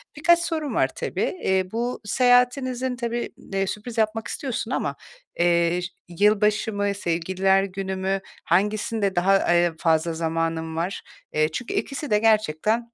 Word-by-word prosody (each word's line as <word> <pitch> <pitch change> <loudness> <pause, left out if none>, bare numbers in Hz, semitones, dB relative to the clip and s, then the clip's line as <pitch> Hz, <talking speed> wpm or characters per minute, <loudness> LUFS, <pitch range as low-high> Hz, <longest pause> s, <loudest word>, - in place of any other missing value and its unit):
Birkaç 340 +3 +4
sorum 325 -4 -2
var - - +3
tabii. - - -3 0.2
Eee, 190 -1 +2
bu 240 +2 -2
seyahatinizin 250 +2 +2
tabii, 235 0 -3 0.2
eee, 195 0 0
sürpriz 225 +4 -6
yapmak 220 0 0
istiyorsun 255 -4 -4
ama, - - -1 0.4
eee, 170 0 +3
ş 180 - -3 0.3
yılbaşı 210 +1 +3
mı, 205 0 0
Sevgililer 190 +1 +1
Günü 190 0 -4
mü, 190 +1 -1 0.2
hangisinde 205 +2 0
daha, 190 +3 +4
ııı, 175 -3 +2
fazla 165 0 +2
zamanın 165 0 -2
var? 175 +4 -2 0.3
Eee, 155 0 +2
çünkü 240 - -4
ikisi 285 +1 -3
de 210 - +4
gerçekten 220 +2 +1
200 Hz, 145 wpm, -24 LUFS, 175-235 Hz, 0.4 s, Birkaç